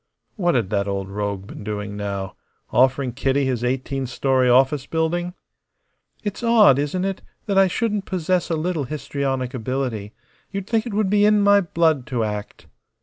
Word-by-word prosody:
What 175 -7 +1
had 115 -6 0
that 100 -1 0
old 100 -1 -3
rogue 100 -1 -3
been 105 - -10
doing 105 -1 -4
now 100 -2 -4 0.4
offering 130 +1 +3
Kitty 135 +2 0
his 125 -3 -1
eighteen 130 +1 -2
story 130 0 +1
office 135 +2 +3
building? 175 +2 -1 0.9
"It's 205 -2 -4
odd, 220 - +5
isn't 165 +6 -1
it, 195 -1 -3 0.2
that 200 -2 +2
I 195 - +6
shouldn't 210 0 -1
possess 180 -1 0
a 165 - +1
little 160 -2 -1
histrionic 135 -2 -3
ability. 125 -4 -3 0.4
You'd 195 -1 -4
think 225 +2 0
it 230 - -5
would 205 -2 +1
be 205 0 +4
in 210 0 +5
my 200 0 +6
blood 160 -6 +1
to 125 -6 -1
act." 105 -1 -5
135 Hz, 170 wpm, -22 LUFS, 120-185 Hz, 0.9 s, I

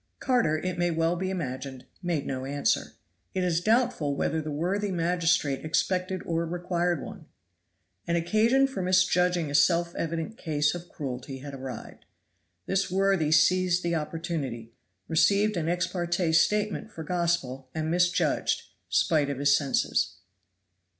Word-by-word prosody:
Carter, 240 -12 +1
it 180 +2 -3
may 175 0 +2
well 165 +1 +1
be 185 +2 -2
imagined, 130 -7 -5 0.2
made 170 -6 -1
no 130 -1 -3
answer. 140 +1 0 0.4
It 185 - 0
is 175 -2 +1
doubtful 220 - +1
whether 160 +3 0
the 155 - -5
worthy 185 +7 -1
magistrate 170 -5 +1
expected 185 +3 -1
or 165 0 0
required 175 0 -1
one. 160 - -10 0.8
An 170 - +1
occasion 220 +10 +3
for 265 -7 -4
misjudging 180 -3 +2
a - - -5
self 170 +3 +3
evident 165 +6 -4
case 150 -2 +1
of 175 0 -8
cruelty 135 -2 -6
had 140 +1 -9
arrived. 130 -1 -8 0.6
This 195 0 0
worthy 190 -4 +2
seized 180 +3 +3
the 170 0 0
opportunity, 150 -8 -4 0.3
received 200 +6 +3
an 165 -2 -1
ex 175 +1 +1
parte 175 -1 -1
statement 210 +6 +1
for 165 - -7
Gospel, 160 -7 -1
and 160 0 -1
misjudged, 175 0 +1 0.3
spite 150 -4 +2
of 140 - -3
his 140 0 +4
senses. 140 - 0
170 Hz, 145 wpm, -27 LUFS, 150-180 Hz, 0.8 s, his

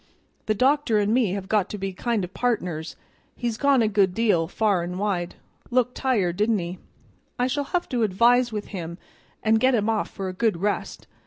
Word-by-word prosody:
The 215 - +2
doctor 260 -1 +2
and 210 +1 +2
me 230 -7 +2
have 195 -1 -4
got 210 -3 +1
to 210 - -5
be 195 -1 -4
kind 225 +2 -1
of 180 +2 -6
partners; 180 -11 -2 0.4
he's 235 -2 -2
gone 275 0 +3
a - - +2
good 195 -3 +2
deal, 205 -8 +2
far 200 -1 +1
an' 175 +1 -4
wide. 185 -4 -2 0.3
Looked 250 0 +1
tired, 200 -10 0
didn't 215 +1 +2
he? 175 0 -5 0.6
I 245 - +1
shall 280 +3 -1
have 350 +5 -1
to 245 -2 -1
advise 235 +4 +3
with 210 -2 -5
him 170 -4 -6 0.5
an' 220 - +3
get 260 0 +4
him 215 -1 +1
off 220 -1 0
for 195 -2 -5
a 185 - -4
good 215 -1 +1
rest. 205 +4 -2
210 Hz, 200 wpm, -24 LUFS, 185-240 Hz, 0.6 s, get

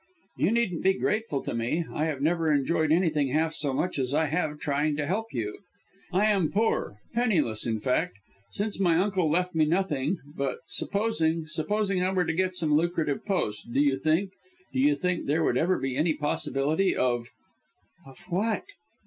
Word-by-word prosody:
"You - - +2
needn't 225 -7 0
be 190 - +4
grateful 210 -12 -1
to - - -3
me. 120 +9 -1
I 155 - 0
have 150 -4 -2
never 165 0 +2
enjoyed 155 +2 +1
anything 160 -4 +2
half 160 +4 +1
so 145 -3 -1
much 175 +4 -1
as 130 +1 -1
I 160 - +3
have 150 0 -1
trying 145 +1 0
to 150 - -1
help 215 +8 -2
you. 110 -4 -4 0.5
I 195 +3 +3
am 195 -7 +2
poor, 210 - 0 0.2
penniless 170 - +1
in 110 -1 -1
fact, 115 -5 0 0.3
since 205 -1 -3
my 175 -4 +3
uncle 185 -3 +1
left 180 +3 +1
me 160 -1 +3
nothing, 170 -1 0 0.2
but 140 -1 -2
supposing 165 -7 0
supposing 195 +5 0
I 185 +1 +1
were 180 -2 +2
to 160 - -1
get 185 +2 0
some 160 -4 0
lucrative 160 -2 +1
post, 120 - -2
do 135 - +1
you 140 -2 +4
think 160 +7 +1 0.4
do 265 - -1
you 290 +3 +4
think 180 -1 -1
there 155 +3 +2
would 125 - +2
ever 175 +8 +2
be 135 -1 -2
any 155 +2 +2
possibility 150 +4 0
of 120 -2 0 0.4
" - - -35
"Of 135 +4 -14
what?" 210 - 0
160 Hz, 185 wpm, -27 LUFS, 145-190 Hz, 0.5 s, be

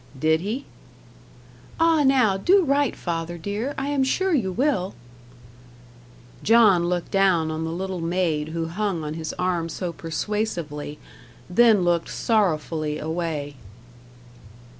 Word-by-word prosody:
"Did 160 +2 +3
he?" 225 +9 -4 1.1
"Ah 330 -2 +4
now, 255 -7 +4
do 370 - +4
write, 280 -2 +1
father 170 0 -4
dear 205 - -4
I 270 +1 -2
am 285 -2 +1
sure 375 +8 +1
you 215 -11 +1
will." 220 -4 0 1.5
John 210 -6 +5
looked 175 -1 -2
down 185 -5 +2
on 160 +1 -3
the - - -3
little 185 +1 -4
maid 165 -3 0
who 165 +1 -3
hung 180 0 -2
on 150 0 -4
his 160 -1 -4
arm 175 -2 -1
so 170 +2 -4
persuasively, 165 -4 -3 0.5
then 220 -1 +5
looked 170 -1 +1
sorrowfully 160 -8 0
away. 155 -3 -3
180 Hz, 125 wpm, -24 LUFS, 165-225 Hz, 1.5 s, John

